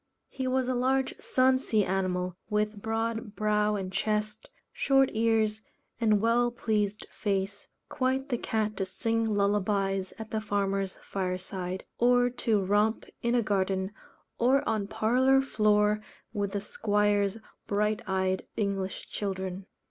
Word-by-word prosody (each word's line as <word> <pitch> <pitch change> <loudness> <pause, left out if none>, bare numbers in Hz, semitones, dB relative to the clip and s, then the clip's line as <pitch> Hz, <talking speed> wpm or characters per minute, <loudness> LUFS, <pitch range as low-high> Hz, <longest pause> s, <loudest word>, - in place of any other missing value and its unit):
He 260 -1 -3
was 255 0 +1
a 255 - +1
large 260 +2 +1
"sonsy" 255 -5 +2
animal, 185 -1 -1
with 210 -1 0
broad 225 -1 -2
brow 210 0 +2
and 190 -2 -4
chest, 215 +1 -1 0.2
short 270 -1 +3
ears, 220 -1 +2 0.4
and 215 -3 +3
well 235 +3 +3
pleased 215 -3 -1
face, 200 -1 -2 0.2
quite 265 0 -1
the 245 - +1
cat 215 -1 -1
to 195 - 0
sing 225 +3 0
lullabies 200 -1 +1
at 220 0 -8
the 220 - -1
farmer's 195 -2 -1
fireside, 185 -1 -4
or 245 0 +4
to 220 -5 0
romp 210 +3 +2 0.2
in 235 +1 +2
garden 190 -1 0 0.5
or 260 +4 +3
on 215 -3 0
parlour 245 +5 +3
floor 210 -4 +2 0.3
with 205 -2 -2
the 200 - -1
squire's 205 -1 +1 0.3
bright 210 +2 +1
eyed 190 0 0
English 195 -2 -2
children. 190 -1 -4
210 Hz, 130 wpm, -29 LUFS, 195-230 Hz, 0.5 s, or